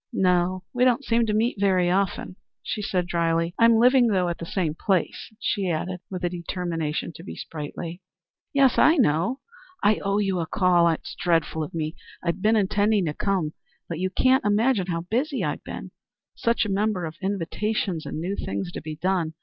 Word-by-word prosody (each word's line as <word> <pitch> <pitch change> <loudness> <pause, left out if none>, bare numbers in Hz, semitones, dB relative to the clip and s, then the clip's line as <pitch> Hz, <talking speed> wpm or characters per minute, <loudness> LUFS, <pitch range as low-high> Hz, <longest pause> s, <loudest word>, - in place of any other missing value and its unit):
"No, 180 0 +1
we 250 0 +2
don't 255 +2 +3
seem 230 0 +2
to 210 - 0
meet 225 0 +1
very 185 -3 +3
often," 195 -1 -1 0.3
she 210 - -3
said 185 -3 0
drily. 165 -1 0
"I'm 230 0 +6
living, 245 +2 +5
though, 185 -5 +1
at 170 - -4
the 170 - -6
same 170 -5 -1
place," 185 +4 -1
she 195 -3 -1
added, 180 +3 -2
with 185 -2 -5
a 175 - +1
determination 170 -3 -3
to 165 - -11
be 195 - -8
sprightly. 165 +3 -6 0.5
"Yes, 275 -3 +4
I 320 - +6
know; 210 - +2 0.4
I 210 +1 +4
owe 200 0 +1
you 195 -3 0
a 165 - -2
call. 175 -2 +3
It's 165 - -3
dreadful 165 -2 0
of 155 +2 -5
me. 155 0 -2 0.3
I've 170 +1 -1
been 215 +3 +4
intending 205 -1 +2
to 150 - -1
come, 180 -4 -1 0.3
but 165 -2 -4
you 185 +1 0
can't 255 +7 +3
imagine 210 -1 +2
how 165 -2 -1
busy 255 - -1
I've - - -2
been. - - -7 0.4
Such 235 -1 +1
a - - -3
number 200 -2 0
of 160 0 -7
invitations, 195 -1 -2
and - - -4
new 185 +5 -2
things 185 -3 -4
to - - -6
be 155 0 -6
done. 170 -1 -1
185 Hz, 190 wpm, -25 LUFS, 170-210 Hz, 0.5 s, I'm